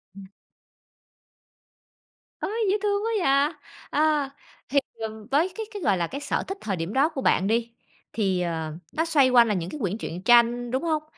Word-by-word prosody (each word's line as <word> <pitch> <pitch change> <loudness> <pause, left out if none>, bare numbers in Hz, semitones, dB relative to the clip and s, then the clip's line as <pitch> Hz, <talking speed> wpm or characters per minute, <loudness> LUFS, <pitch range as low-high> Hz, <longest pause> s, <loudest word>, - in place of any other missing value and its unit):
Ừm. 195 -1 -10 2.2
Ôi! - - -3 0.2
Dễ 415 - +2
thương 410 0 +1
quá 455 - 0
vậy! 280 +2 +3 0.4
À, 300 -2 +2 0.4
thì, 280 +3 +4 0.2
ừm, 220 -1 -6
với 320 +7 +3
cái 445 - -4
cái, 410 -3 -7
gọi 200 - +2
là, 170 -1 -1
cái 280 - -6
sở - - -1
thích 390 - -4
thời 200 - -2
điểm 170 +3 -4
đó 280 +4 +3
của 275 -5 -5
bạn 190 - +2
đi, 230 +2 0 0.4
thì, 190 -5 0
ờ, 160 -3 -3 0.2
nó 320 - 0
xoay 295 -6 +4
quanh 240 -2 +6
là 210 - +1
những 175 -2 -3
cái 300 - -7
quyển 200 -3 -2
truyện 180 -5 -6
tranh, 240 +1 +4
đúng 260 +4 -1
hông? 315 -2 0
245 Hz, 195 wpm, -25 LUFS, 200-305 Hz, 2.2 s, quanh